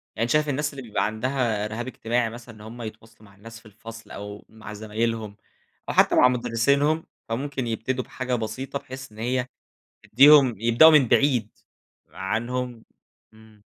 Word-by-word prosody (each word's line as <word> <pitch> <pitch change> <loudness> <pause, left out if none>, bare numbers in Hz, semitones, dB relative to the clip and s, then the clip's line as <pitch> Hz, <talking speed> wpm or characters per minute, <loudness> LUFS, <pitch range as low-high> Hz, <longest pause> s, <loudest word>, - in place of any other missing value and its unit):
يعني 115 - -1
أنت 120 - -1
شايف 150 -1 +2
الناس 150 +2 -2
اللي 135 - -8
بيبقى 110 -3 -1
عندها 110 -1 -1
رِهاب 115 +3 -5
اجتماعي 120 -1 -1
مثلًا، 120 0 -11
إن 105 - -15
هُم 115 +3 -10
يتواصلوا 110 -1 -11
مع 100 - -21
الناس 115 +3 -12
في 120 - -26
الفصل 115 +2 -12
أو 105 0 -9
مع 110 -1 -11
زمايلهم 110 0 -3 0.5
أو - - -1
حتى - - +4
مع 125 - +6
مُدرسينهُم، 140 +6 +1 0.2
فممكن 130 +1 -3
يبتدوا 125 +3 -2
بحاجة 130 -1 -3
بسيطة 130 +5 -4
بحيث 130 -2 -10
إن 105 - -17
هي 125 +2 -1 0.6
تديهم 135 0 +6
يبدؤوا 120 +9 +6
من 145 -5 +5
بعيد 125 -7 +2 0.6
عنهم، 120 +4 -4 0.5
إمم. 110 -1 -20
115 Hz, 160 wpm, -24 LUFS, 110-130 Hz, 0.6 s, مع